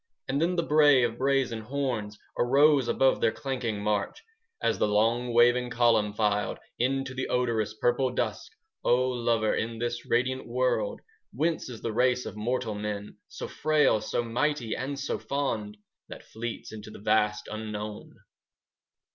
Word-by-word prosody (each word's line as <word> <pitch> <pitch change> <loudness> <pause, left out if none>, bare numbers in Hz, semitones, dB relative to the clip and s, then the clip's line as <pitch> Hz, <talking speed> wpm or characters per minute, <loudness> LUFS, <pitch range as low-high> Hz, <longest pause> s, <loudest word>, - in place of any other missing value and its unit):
And 140 +2 0
then 175 +2 +1
the 170 - +1
bray 145 -4 +5
of 115 0 -1
brazen 135 -4 +1
horns 120 -4 -3 0.2
5 120 - +1
Arose 140 0 +5
above 135 +2 +2
their 115 - +3
clanking 120 -7 -3
march, 105 -1 -1 0.4
As - - 0
the - - +3
long 115 +4 +2
waving 120 +1 +4
column 115 -3 +3
filed 105 -1 0 0.2
Into 135 +1 0
the 130 0 -3
odorous 115 -4 0
purple 120 +3 +1
dusk. 125 - -3 0.3
O 125 +1 +3
lover, 115 -3 +1
in 115 +1 -2
this 120 +1 -3
radiant 130 +2 0
world 120 -4 0 0.3
Whence 160 +2 -1
is 120 -3 -8
the 115 - -2
race 125 +2 +2
of - - -6
mortal 115 +1 -2
men, 105 0 -3
10 105 - -14
So - - -7
frail, 150 -8 +2
so 120 - -1
mighty, 120 +1 -1
and 140 +2 -4
so 140 - -2
fond, 110 -7 -2 0.3
That - - -10
fleets 115 +1 -6
into 110 -1 -9
the - - -10
vast 105 0 +1
unknown? 105 -1 -6
120 Hz, 160 wpm, -28 LUFS, 110-130 Hz, 0.4 s, bray